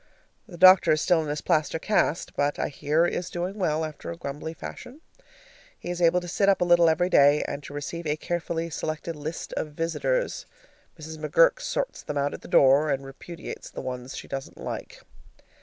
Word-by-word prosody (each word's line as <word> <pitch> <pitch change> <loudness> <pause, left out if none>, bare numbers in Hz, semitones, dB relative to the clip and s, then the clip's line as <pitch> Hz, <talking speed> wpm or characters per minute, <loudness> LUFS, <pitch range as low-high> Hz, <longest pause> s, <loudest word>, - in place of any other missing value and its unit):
The 175 - -11
doctor 185 -1 +7
is 155 - +1
still 175 -3 +3
in 155 - -5
his 145 0 -3
plaster 155 +1 +1
cast, 170 -2 0
but 145 0 0
I - - -1
hear 150 +4 +1
is 175 +1 -2
doing 180 +4 -4
well, 160 -3 0
after 155 -1 -8
a 170 - -6
grumbly 150 +1 -6
fashion. 260 - -9 0.8
He 175 - -6
is 175 0 -4
able 170 +1 +4
to 175 - -8
sit 195 +3 +2
up 195 - +3
a 180 - +2
little 175 -1 +5
every 160 +3 +2
day 145 -3 +5
and 140 - -5
to 140 - -10
receive 165 +3 -5
a 150 - +1
carefully 170 0 -3
selected 155 +1 -4
list 150 +3 -6
of 150 - -4
visitors. 170 - -1 0.5
Mrs. 160 0 -8
McGurk - - +4
sorts - - -3
them 145 - -5
out 140 0 0
at - - -8
the - - -11
door, 140 +3 +5
and 135 -1 -1
repudiates 165 +5 -9
the - - -7
ones 125 0 -6
she - - -8
doesn't 135 0 -6
like. - - -7
160 Hz, 200 wpm, -26 LUFS, 145-175 Hz, 0.8 s, doctor